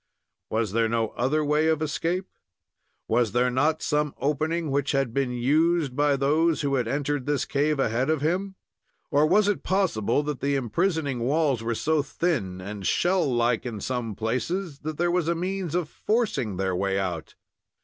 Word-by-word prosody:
Was 110 -2 0
there 115 +1 +1
no 115 -1 0
other 150 +5 0
way 150 +2 +2
of 160 -1 +2
escape? 165 +4 -1 0.8
Was 120 -4 +1
there 125 +1 +2
not 150 +5 +1
some 150 -1 0
opening 155 +2 -1
which 140 +1 0
had 135 -4 0
been 135 -1 0
used 145 +3 +1
by 145 0 +3
those 155 +4 +2
who 140 -2 -1
had 125 -4 +1
entered 145 +1 -2
this 145 -1 0
cave 150 +1 +1
ahead 125 +2 +1
of 160 -1 +2
him? 185 +5 -1 0.6
Or 145 +1 +4
was 210 +5 +4
it 205 - 0
possible 150 - +1
that 145 -2 -3
the 140 +1 0
imprisoning 140 - 0
walls 135 0 +1
were 115 0 -2
to 155 +5 +1
thin 135 - -2
and 100 +2 -7
shell 175 -5 +2
like 120 -1 +1
in 115 -4 -5
some 120 -1 -3
places 140 - -2
that 155 0 -5
there 175 0 +1
was 175 -2 +1
a 170 - +1
means 180 -1 -3
of 175 -3 0
forcing 155 - -1
their 95 -1 0
way 95 +1 0
out? 90 -5 -3
145 Hz, 180 wpm, -26 LUFS, 120-160 Hz, 0.8 s, Or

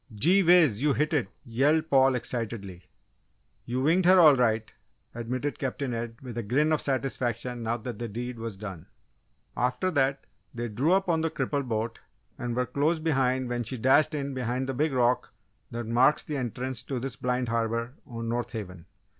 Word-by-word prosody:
"Gee 170 - +4
whiz! 165 - +5
you 145 -1 +3
hit 150 +4 0
it!" 135 -10 +1 0.2
yelled 145 +7 +1
Paul, 135 -1 +5
excitedly. 110 -7 -4 0.8
"You 125 +2 -2
winged 170 +5 +3
her 185 0 +7
all 155 -5 +8
right!" 115 -3 +2 0.5
admitted 125 +5 -3
Captain 135 -1 -3
Ed, 115 0 -4
with 120 -2 -5
a - - -1
grin 135 +9 +1
of 155 - +2
satisfaction 125 -3 -2
now 115 +1 -1
that 120 +1 -7
the 120 - -3
deed 120 +2 -5
was 115 -3 -5
done. 95 -5 -8 0.7
After 125 +9 0
that 135 -3 +1 0.3
they 120 0 -3
drew 130 +10 +1
up 195 0 +2
on 165 -2 +2
the 165 - +1
crippled 140 -4 -2
boat 115 +1 -2 0.4
and 120 -1 -3
were 125 0 +1
close 145 +6 +1
behind 130 -5 +1
when 120 0 -2
she 120 +3 -4
dashed 135 +6 +4
in 140 -1 -3
behind 130 0 -2
the 135 - -2
big 150 +4 0
rock 125 -1 +1 0.4
that 115 0 -5
marks 125 +6 +3
the 150 - -5
entrance 125 0 -3
to 130 0 -4
this 130 0 -4
blind 125 -1 -1
harbour 115 +1 -1
on 115 -3 -6
North 120 +1 -2
Haven. 90 -6 -7
125 Hz, 185 wpm, -27 LUFS, 115-140 Hz, 0.8 s, all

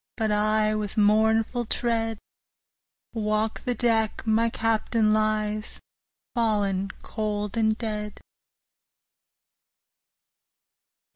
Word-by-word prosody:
But 220 -2 0
I, 215 +1 +2
with 210 -1 -3
mournful 220 +3 +3
tread, 225 -2 0 1.0
Walk 215 0 -1
the 245 -1 0
deck 225 -3 0
my 225 +1 +2
Captain 225 -1 +1
lies, 215 0 -1 0.5
Fallen 205 -4 0
cold 210 -2 -3
and 220 -1 +2
dead. 210 -2 -4
215 Hz, 80 wpm, -26 LUFS, 210-225 Hz, 1.0 s, mournful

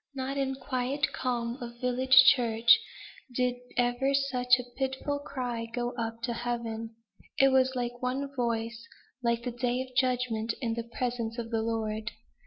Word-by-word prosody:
Not 265 +1 -3
in 270 -1 -1
quiet 270 +2 -1
calm 240 0 -2
of 235 0 -7
village 260 +1 +6
church 230 -2 +5 0.6
did 250 0 +1 0.2
ever 245 +3 +2
such 250 -3 +3
a 250 - -4
pitiful 265 +2 -2
cry 245 -5 -4
go 240 0 -2
up 230 -1 -4
to 240 -1 -1
heaven; 230 -1 -4 0.4
it 270 - +6
was 260 0 +3
like 245 0 -3
one 270 +2 -2
voice 230 -2 -2 0.4
like 235 -1 0
the 245 - -2
day 245 +1 -1
of 255 -1 -16
judgment 245 -3 +1
in 230 -4 -1
the 235 0 -5
presence 240 -2 -2
of 230 -1 -5
the 225 -1 +1
Lord. 220 -1 -2
245 Hz, 160 wpm, -29 LUFS, 235-260 Hz, 0.6 s, village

